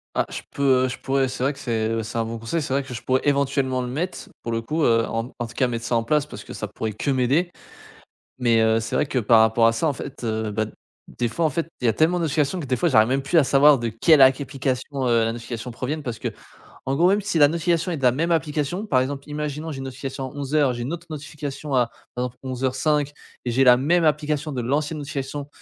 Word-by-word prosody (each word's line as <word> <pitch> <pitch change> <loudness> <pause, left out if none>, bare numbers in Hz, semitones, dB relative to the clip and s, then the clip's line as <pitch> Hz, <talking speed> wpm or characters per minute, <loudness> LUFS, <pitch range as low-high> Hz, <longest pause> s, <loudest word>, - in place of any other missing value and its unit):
Ah - - +1
je - - -6
peux, 130 -2 +3
heu, - - +1
je - - -6
pourrais, 135 0 +1
c'est 125 0 -6
vrai 140 +2 +1
que 140 - -14
c'est, 110 -3 -1
heu, 115 0 -1
c'est 115 +1 -4
un 115 - 0
bon 115 0 -5
conseil, 115 +9 -2
c'est 140 - -5
vrai 140 +1 +1
que 130 -1 -9
je 120 - -6
pourrais 130 0 +1
éventuellement 135 -2 +1
le 125 - -3
mettre 160 +9 -4
pour 115 - -3
le 115 0 -1
coup, 155 +7 -1
heu, 115 -1 +3
en 115 +3 -3
en 120 - -2
tout 115 - -13
cas 130 - +2
mettre 115 -1 -4
ça 120 - 0
en 115 - +2
place 150 +4 +1
parce - - -9
que - - -10
ça - - -5
pourrait 110 -1 -4
que 140 - -3
m'aider 135 +7 +2 0.9
mais 115 -2 +3
heu, 110 0 +3
c'est 110 - -4
vrai - - +2
que 135 - -1
par 115 0 +5
rapport 110 +1 +4
à - - +4
ça 115 +8 0
en 145 - +1
fait, 135 +1 -8
heu, 110 -1 -2
bah 110 +1 -1 0.5
des 120 -2 0
fois 165 +7 -1
en 155 - +3
fait, 165 +4 -2
il 125 - -3
y - - +4
a 110 - +3
tellement 165 +9 +2
de 170 - -1
notification 155 +3 0
que 150 - -5
des 130 - 0
fois 175 +5 +1
j'arrive 110 -5 +5
même 135 +2 +1
plus 165 +5 +1
à 150 - +6
savoir 140 0 +6
de 120 - -2
quelle 145 +8 +4
ac 130 +2 +6
application, 135 0 -2
heu, 115 -1 +3
la 115 - 0
notification 120 +1 -6
proviennent. 145 +6 -4
Parce 120 -3 -5
qu'en - - -2 0.7
gros, 175 +3 +4
même 205 - +3
si 200 -4 -1
la 145 - +8
notification 170 +2 0
est - - -2
de - - -11
la 125 -1 +5
même 165 +6 -1
application, 160 +4 -1
par 130 -9 +3
exemple 140 +2 -4
imaginons, 150 +1 -4
j'ai 135 - -7
une 135 - -5
notification 135 0 -5
à - - -5
11:00, 140 -1 +1
j'ai 120 - -5
une 130 +7 -3
autre 175 +1 -9
notification 145 -1 -6
à, 125 -2 +3 0.3
par 125 0 -1
exemple 125 0 -6
à - - -7
11:05 135 +3 0 0.3
et 125 - -1
j'ai 135 +3 +3
la 125 -1 +8
même 165 +6 +2
application 150 0 0
de 125 -2 -2
l'ancienne 150 +5 -1
notification, 140 0 -5
135 Hz, 275 wpm, -23 LUFS, 120-150 Hz, 0.9 s, la